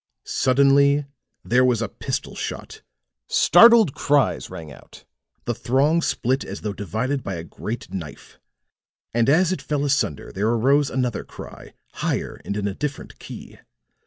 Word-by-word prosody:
Suddenly 140 +2 +3 0.4
there 125 +2 +3
was 125 -3 +2
a 115 - -1
pistol - - -5
shot; - - -6 0.5
startled 225 - +6
cries 145 -1 +1
rang 80 -3 -9
out; - - -15 0.4
the 120 - -1
throng 140 +9 +1
split 135 -3 0
as 100 - -7
though 105 -2 -3
divided 115 +8 -2
by 100 -4 -4
a 80 - -6
great 105 +3 -7
knife. 80 -7 -8 0.7
And 115 +2 +2
as 175 +5 +4
it 185 - -2
fell 145 -1 -2
asunder 130 - -1
there 105 +3 -1
arose 135 +5 +2
another 125 -3 -2
cry, - - -12 0.2
higher - - -3
and 100 - -4
in 100 -1 -1
a 100 - -2
different 145 +6 -6
key. - - -11
130 Hz, 150 wpm, -23 LUFS, 105-145 Hz, 0.7 s, startled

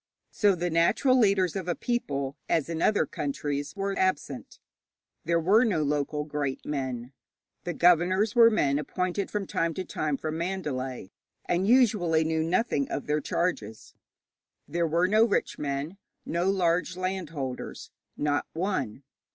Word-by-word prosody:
So 205 -3 +3
the 175 0 -2
natural 170 - +3
leaders 195 -7 +3
of 190 -2 -4
a 175 - 0
people, 140 - -2
as 165 -1 +1
in 165 -1 -3
other 210 - +3
countries, 145 +1 -3
were 195 0 -2
absent. 145 - -2 0.7
There 170 +1 +2
were 200 +8 +4
no 185 -10 +1
local 150 0 -1
great 145 -3 -3
men; 130 -3 -4 0.5
the 175 - -2
governors 180 +5 +3
were 230 -2 +7
men 145 -10 +1
appointed 180 +6 -2
from 205 -2 -2
time 165 -3 -1
to 185 - -4
time 150 -4 -2
from 155 +2 -4
Mandalay, 135 - -4 0.3
and 180 +2 0
usually 210 -10 +4
knew 160 0 0
nothing 165 - 0
of - - -3
their 150 +1 0
charges; 110 - -3 0.7
there 170 0 0
were 170 +3 +2
no 215 +3 +4
rich 225 -3 0
men, 145 +6 -3 0.3
no 175 +3 0
large 180 -1 +1
land 185 -2 -3
holders 135 -5 -6 0.3
not 145 -1 0
one. 160 - -2
170 Hz, 150 wpm, -27 LUFS, 145-190 Hz, 0.7 s, were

